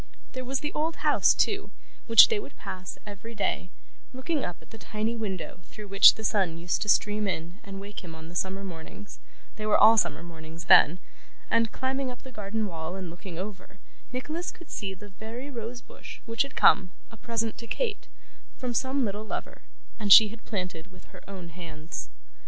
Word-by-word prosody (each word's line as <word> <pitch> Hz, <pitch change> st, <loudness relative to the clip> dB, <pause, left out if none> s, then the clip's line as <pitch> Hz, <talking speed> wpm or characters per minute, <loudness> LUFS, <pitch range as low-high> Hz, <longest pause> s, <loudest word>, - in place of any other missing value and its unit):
There 255 Hz, -1 st, -5 dB
was 265 Hz, +2 st, -2 dB
the 295 Hz, -, -3 dB
old 320 Hz, +2 st, -1 dB
house -, -, +5 dB
too, 405 Hz, -2 st, +1 dB, 0.4 s
which 230 Hz, -2 st, +10 dB
they 445 Hz, -, +1 dB
would 415 Hz, -, -10 dB
pass 185 Hz, 0 st, -7 dB
every 210 Hz, +3 st, -9 dB
day, 200 Hz, -3 st, -1 dB, 0.5 s
looking 275 Hz, +3 st, -1 dB
up 175 Hz, -, -5 dB
at -, -, -20 dB
the 225 Hz, -, -11 dB
tiny 215 Hz, +3 st, -2 dB
window 195 Hz, -6 st, -5 dB
through 210 Hz, -2 st, -11 dB
which 195 Hz, 0 st, +8 dB
the 220 Hz, -, -8 dB
sun 190 Hz, -6 st, +1 dB
used 175 Hz, +1 st, -1 dB
to 210 Hz, -, -1 dB
stream 210 Hz, 0 st, +3 dB
in 175 Hz, +1 st, -4 dB
and 195 Hz, -1 st, -8 dB
wake 200 Hz, 0 st, -8 dB
him 165 Hz, -2 st, -9 dB
on 160 Hz, 0 st, -10 dB
the 170 Hz, -, -11 dB
summer 190 Hz, +2 st, -2 dB
mornings 185 Hz, +3 st, -9 dB, 0.4 s
they 215 Hz, -, -4 dB
were 210 Hz, -, +5 dB
all 220 Hz, +2 st, +8 dB
summer 205 Hz, -, +1 dB
mornings 165 Hz, 0 st, -10 dB
then 170 Hz, 0 st, +7 dB, 0.5 s
and 230 Hz, -2 st, +3 dB
climbing 265 Hz, +2 st, -2 dB
up 250 Hz, -, -9 dB
the 260 Hz, -, -10 dB
garden 215 Hz, -1 st, -3 dB
wall 165 Hz, -2 st, -5 dB
and 185 Hz, -3 st, -6 dB
looking 175 Hz, 0 st, -9 dB
over, 190 Hz, 0 st, -7 dB, 0.3 s
Nicholas 305 Hz, +8 st, -3 dB
could 340 Hz, -, -13 dB
see 195 Hz, -2 st, -4 dB
the 205 Hz, +2 st, -12 dB
very 230 Hz, +7 st, -8 dB
rose 240 Hz, 0 st, -6 dB
bush -, -, -11 dB
which 230 Hz, +2 st, 0 dB
had 275 Hz, -1 st, -2 dB
come, 190 Hz, -3 st, +5 dB, 0.2 s
a -, -, -11 dB
present 225 Hz, 0 st, -2 dB
to 230 Hz, -, -8 dB
Kate, 450 Hz, -, -2 dB, 0.5 s
from 250 Hz, -2 st, -3 dB
some 265 Hz, +2 st, +1 dB
little 205 Hz, +1 st, -3 dB
lover, 220 Hz, -, -6 dB, 0.4 s
and 205 Hz, -2 st, 0 dB
she 215 Hz, +2 st, +11 dB
had 225 Hz, +1 st, -12 dB
planted 180 Hz, -4 st, -5 dB
with -, -, -15 dB
her -, -, -12 dB
own 185 Hz, -4 st, -8 dB
hands. 165 Hz, -2 st, -8 dB
210 Hz, 200 wpm, -28 LUFS, 185-235 Hz, 0.5 s, she